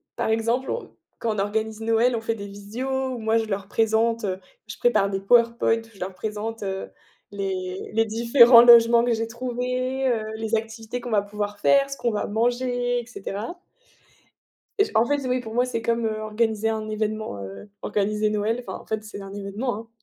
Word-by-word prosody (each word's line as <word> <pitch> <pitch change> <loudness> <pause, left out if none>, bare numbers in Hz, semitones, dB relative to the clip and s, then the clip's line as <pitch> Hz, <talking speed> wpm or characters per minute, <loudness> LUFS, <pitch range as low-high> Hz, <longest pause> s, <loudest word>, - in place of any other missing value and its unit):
par - - -1
exemple, 230 +4 0
on 480 - -5 0.2
quand 225 -2 -1
on - - -3
organise 215 +2 -2
Noël, 230 +2 +2
on - - -4
fait 225 0 -1
des 200 -1 -7
visio, 205 +5 -7 0.3
où - - -5
moi 220 0 +1
je 225 - 0
leur 195 -2 -4
présente, 225 +1 +1 0.4
je - - -8
prépare 340 - +2
des 195 0 -3
PowerPoint, 235 +1 +3
où 225 0 -10
je 195 - -18
leur 185 +1 -4
présente, 215 +2 -5
heu, 190 0 -4 0.4
les 190 -2 -4
les 225 +1 +3
différents 235 +2 +7
logements 235 0 +7
que 240 - +2
j'ai 225 0 -1
trouvés, 255 +2 -2
heu, 230 -3 +1
les 220 0 -1
activités 225 +2 -4
qu'on 245 0 -6
va 210 -2 +3
pouvoir 205 0 -5
faire, 275 +5 +4
ce 275 - -6
qu'on 240 - 0
va 210 - -2
manger, 245 +2 0
et 235 - -7
cetera 220 - -6 1.2
et 410 - +6
je - - -10
en 220 - +5
fait, 285 -2 -1
oui, 250 0 +1
pour 225 -2 -8
moi, 245 +1 +3
c'est 250 -3 -3
comme, 230 0 0
heu, 215 -1 -2
organiser 220 0 0
un 220 -1 -2
événement, 215 - -3
heu, 100 - -9
organiser 210 +1 0
Noël. 215 +3 -1
Enfin, - - -5
en - - -16
fait, 220 0 -3
c'est 215 -1 -8
un 195 - -9
événement, 205 +4 -3
hein 225 +1 -9
225 Hz, 205 wpm, -24 LUFS, 210-235 Hz, 1.2 s, différents